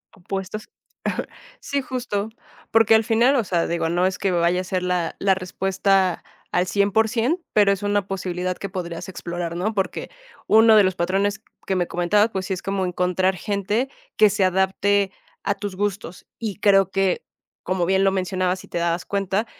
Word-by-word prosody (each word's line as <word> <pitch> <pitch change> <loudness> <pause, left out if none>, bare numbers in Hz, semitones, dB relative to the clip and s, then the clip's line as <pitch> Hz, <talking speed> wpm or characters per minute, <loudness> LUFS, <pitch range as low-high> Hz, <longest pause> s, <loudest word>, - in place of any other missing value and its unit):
Opuestos. 195 +3 -6 0.9
Sí, 280 -1 -2
justo, 240 -5 -3 0.4
porque 225 0 +5
al 220 - +4
final, 230 +5 +3
o 240 - +2
sea, 175 -3 0
digo, 170 -1 -1
no 175 +2 +1
es 185 0 0
que 195 - 0
me 175 - +1
vaya 175 +2 +2
a - - -6
ser 185 0 -2
la, 180 -2 -1
la 195 -1 +3
respuesta 190 0 0 0.3
al 180 - +2
100 200 +2 +1
por 220 0 +3
100 255 - 0
pero 205 -2 +5
es 200 +1 -6
una 205 -1 0
posibilidad 185 -1 -3
que 195 - -5
podrías 175 -2 -5
explorar, 170 -2 -5
¿no? 210 +5 -1
Porque 195 -3 -2 0.4
uno 220 0 +7
de 210 - +7
los 185 -1 0
patrones 200 +4 0 0.2
que 190 - +1
me 175 -2 0
comentabas, 205 +5 +2
pues 190 -1 -3
sí, 195 - -1
es 185 - -5
como 195 -1 -1
encontrar 180 +1 +1
gente 205 +6 -1 0.3
que 215 -1 +6
se 195 -1 +1
adapte 190 +1 +2 0.3
a 200 - 0
tus 200 -1 -5
gustos, 200 -2 -3
y 215 -4 -3
creo 195 -3 +5
que 195 -1 +1 0.4
como 185 -1 0
bien 190 +2 +2
lo 195 - +4
mencionabas 185 -1 -1
y - - -21
te - - -4
dabas 170 +1 0
cuenta 200 +2 -1
195 Hz, 190 wpm, -23 LUFS, 180-205 Hz, 0.9 s, uno